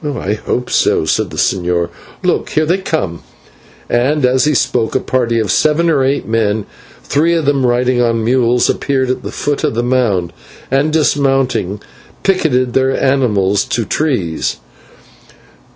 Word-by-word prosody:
"I 140 -9 -2
hope 125 +3 -3
so," - - +2
said - - 0
the - - -9
señor. 90 -2 0 0.3
"Look, - - 0
here 155 - +1
they 175 +5 +1
come," 125 - -3 0.7
and 130 +4 +1
as 130 +2 +2
he 150 -1 +2
spoke 115 -2 0
a - - +3
party 120 -3 0
of 110 - 0
seven 165 +2 +2
or 140 -4 +2
eight 135 +2 0
men, 110 -2 0 0.4
three 165 +4 +1
of 165 -3 -1
them 135 -2 +2
riding 125 +1 +1
on 115 -1 +1
mules, 120 0 +2
appeared 130 -2 0
at 130 - -3
the - - -6
foot 145 -1 -2
of - - 0
the 120 - 0
mound, 110 -9 0 0.4
and, 140 +3 +2
dismounting, 135 - +1 0.4
picketed 130 -10 +1
their 130 0 +1
animals 105 -8 +1
to 120 -3 -2
trees. 105 - -1
125 Hz, 155 wpm, -15 LUFS, 110-140 Hz, 0.7 s, a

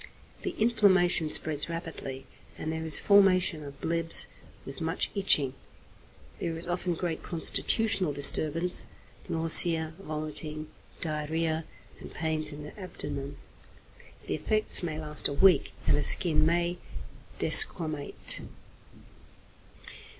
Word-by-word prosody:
The - - -8
inflammation 195 -7 0
spreads 155 0 +2
rapidly, 160 -6 -10 0.3
and 155 - -8
there 160 0 -8
is 160 -1 +4
formation 185 -5 0
of 140 -1 -14
blebs 165 0 +2 0.4
with - - -12
much - - -3
itching. 150 -10 0 0.9
There 165 -1 -7
is 165 - -10
often 175 0 -6
great 165 -1 -7
constitutional 185 +1 0
disturbance, 155 +4 +3 0.4
nausea, 160 0 +5
vomiting, 155 -2 -9 0.3
diarrhoea, 160 +1 -5 0.3
and - - -14
pains 155 -1 -3
in 150 0 -13
the 150 - -14
abdomen. 140 -6 -10 0.9
The - - -7
effects 215 -1 -2
may 160 -3 -8
last 150 -1 0
a - - -8
week, 175 0 0
and - - -1
the 150 - -4
skin 155 0 +3
may 175 +1 -4 0.6
desquamate. 145 - +5
160 Hz, 115 wpm, -24 LUFS, 150-175 Hz, 0.9 s, nausea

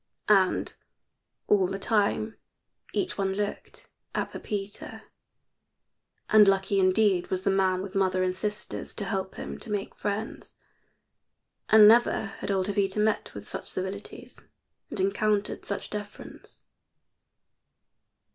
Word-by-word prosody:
And 195 -3 +3 0.7
all 195 -3 +3
the 195 +1 -3
time 215 +1 0 0.5
each 365 - -2
one 195 -1 0
looked 205 +1 -5 0.3
at - - -1
Pepita, 205 -1 -6 1.2
and 215 -1 +7
lucky 195 0 +2
indeed 185 -1 +3
was 185 0 -2
the 195 - +2
man 190 -1 +2
with 195 -1 -7
mother 185 -1 +1
and 185 0 +1
sisters 210 +2 -4
to 205 - -3
help 190 -1 -3
him - - -6
to 235 - -9
make 205 -1 -3
friends. 210 +2 -5 1.1
And 215 -1 +9
never 230 0 +5
had - - -5
old 190 -2 +1
Jovita 200 0 0
met 215 0 0
with - - -8
such - - -6
civilities, 190 +2 -6 0.5
and - - -5
encountered 200 +2 0
such 200 - -4
deference. 205 -1 -9
200 Hz, 125 wpm, -27 LUFS, 190-210 Hz, 1.2 s, And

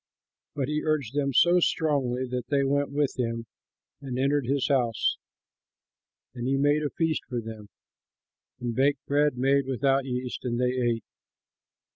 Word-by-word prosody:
But 135 -3 -1
he 150 0 -1
urged 150 -6 -1
them 140 -1 0
so 175 +7 +5
strongly 140 -7 +1
that 125 -1 -4
they 140 -1 +2
went 140 +1 +1
with 140 -1 -1
him 115 -1 -2 0.6
and 130 -3 -5
entered 140 0 +1
his 140 0 +1
house. 125 -5 +1 1.1
And 125 0 -4
he 135 +1 +2
made 145 +2 +3
a 150 - -1
feast 160 0 -1
for 125 -2 -2
them 110 -2 -8 0.9
and 120 -1 -3
baked 135 +2 +1
bread 145 -1 +2
made 135 +1 +2
without 135 +1 +1
yeast, 125 -1 -4
and 120 -1 -2
they 125 0 +2
ate. 120 -3 0
135 Hz, 155 wpm, -27 LUFS, 125-145 Hz, 1.1 s, so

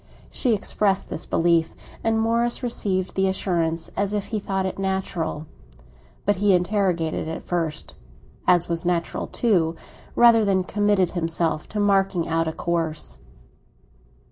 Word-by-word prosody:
She 240 -4 +2
expressed 195 -1 0
this - - -4
belief, 165 -1 +2 0.3
and 225 0 +2
Morris 235 +2 +1
received 190 -6 -1
the 190 0 +1
assurance 170 -4 -1
as 200 +1 -1
if 205 -1 -2
he 215 - +1
thought 195 -1 -2
it 190 - -4
natural; 190 -5 -2 0.8
but 205 -1 +2
he 205 0 +3
interrogated, 180 -4 0
at 160 - -5
first—as 165 - -2
was 170 -1 -1
natural 175 -1 -1
too—rather 220 +4 +2
than 195 -2 +2
committed 205 -1 +1
himself 165 -2 -1
to 210 - -3
marking 195 -4 +2
out 165 0 0
a - - 0
course. 165 -2 -3
185 Hz, 130 wpm, -23 LUFS, 165-205 Hz, 0.8 s, he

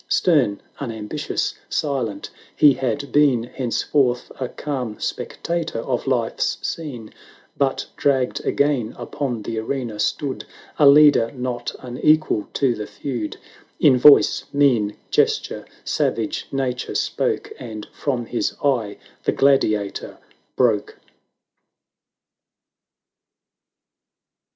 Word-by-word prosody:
Stern, 130 - +2 0.2
unambitious, 110 -6 -3 0.2
silent, 135 -8 -2 0.2
he 145 -2 +6
had 130 +2 -3
been 140 -6 +4
Henceforth 125 +1 0
a 130 -2 -2
calm 130 -7 -4
spectator 170 -5 -3
of 125 +2 -2
Life's 120 -4 0
scene; 130 -9 -6 0.4
But 135 -1 0
dragged 130 -3 +1
again 140 -6 0
upon 120 -1 -4
the 115 +1 -3
arena, 115 -2 -4
stood 140 -3 -1 0.4
A 145 - +7
leader 145 -5 +6
not 125 -1 -4
unequal 130 -1 +1
to 135 -3 +2
the 105 -2 -6
feud; 120 -7 -5 0.4
In 140 -3 +6
voice 140 +3 +6
— - - -35
mien 115 -7 +3
— - - -38
gesture - - +1
— - - -31
savage - - -1
nature 130 -2 -2
spoke. - - -1
And 110 -3 -7
from 125 -5 -2
his 120 - -2
eye 120 -8 +1 0.3
the - - +3
gladiator 110 -7 +1 0.4
broke. 115 -5 +1
125 Hz, 110 wpm, -22 LUFS, 115-140 Hz, 0.4 s, A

